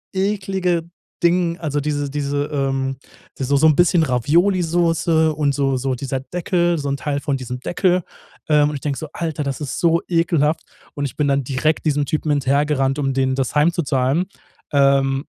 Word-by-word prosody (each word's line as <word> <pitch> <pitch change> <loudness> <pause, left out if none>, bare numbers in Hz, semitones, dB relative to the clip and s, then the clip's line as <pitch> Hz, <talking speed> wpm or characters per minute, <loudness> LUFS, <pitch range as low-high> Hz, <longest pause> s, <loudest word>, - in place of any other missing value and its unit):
eklige 190 -3 0 0.4
Ding, 170 -1 +2
also 150 -3 -2
diese 145 -1 -2
diese, 145 0 -2
ähm 135 -2 -1 0.4
die 135 - -2
so 140 +2 +1
so 155 +3 +5
'n 155 - +4
bisschen 175 0 +4
Ravioli-Soße 165 - +2
und 145 -2 0
so 135 -2 +1
so 130 +1 -1
dieser 135 +1 -3
Deckel, 175 +2 0
so 145 -1 -3
'n 140 - -1
Teil 140 +1 -2
von 140 -3 -1
diesem 125 0 -6
Deckel, 180 +5 +1 0.5
ähm, 150 -1 +4
und 150 - -4
ich 140 - -6
denke 140 -2 -2
so, 155 - -6
Alter, 160 -3 -3
das 140 +1 -4
ist 145 - -4
so 170 -1 +3
ekelhaft. 165 -3 +1 0.3
Und 145 0 -2
ich 135 - -5
bin 150 -1 +1
dann 140 -1 +1
direkt 140 +5 -1
diesem 145 -2 +1
Typen 155 +1 -1
hinterhergerannt, 140 0 +1
um 135 -1 0
dem 130 0 +1
das 135 -2 -2
heimzuzahlen. 150 -1 +1 0.5
Ähm, 135 0 +3
145 Hz, 180 wpm, -20 LUFS, 135-165 Hz, 0.5 s, so